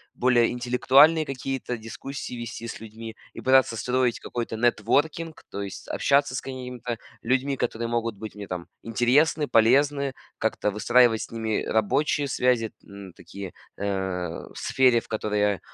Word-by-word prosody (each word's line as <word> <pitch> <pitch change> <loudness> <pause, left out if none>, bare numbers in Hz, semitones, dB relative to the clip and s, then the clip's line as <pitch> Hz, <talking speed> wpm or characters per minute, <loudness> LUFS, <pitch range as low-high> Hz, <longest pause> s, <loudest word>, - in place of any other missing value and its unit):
более 120 -2 +3
интеллектуальные 130 +6 +4
какие-то 135 -2 -3
дискуссии 125 +5 -7
вести 115 -1 -6
с - - -7
людьми 110 0 -9 0.2
и - - -8
пытаться 130 -3 +4
строить 125 0 0
какой-то 120 -2 -4
нетворкинг, 145 +8 0
то 100 - -4
есть 100 -1 -7
общаться 140 -1 +2
с 130 - -2
какими-то 125 -2 -6 0.2
людьми, 135 +3 0
которые 115 -1 -2
могут 115 -1 -1
быть 110 +1 -7
мне, 105 -1 -8
там, 90 -2 -6
интересны, 135 +7 +2
полезны, 140 +4 +3 0.3
как-то 110 -1 0
выстраивать 115 +2 +4
с - - -6
ними 110 -2 -1
рабочие 140 +7 +1
связи, 125 -4 +1
м, 100 -2 -11
такие, 100 -2 -9 0.2
э, 95 -4 -3
в - - -17
сфере, 125 -3 +3
в - - -14
которой 105 -1 -2
я, 105 -2 +2
120 Hz, 150 wpm, -25 LUFS, 110-130 Hz, 0.3 s, интеллектуальные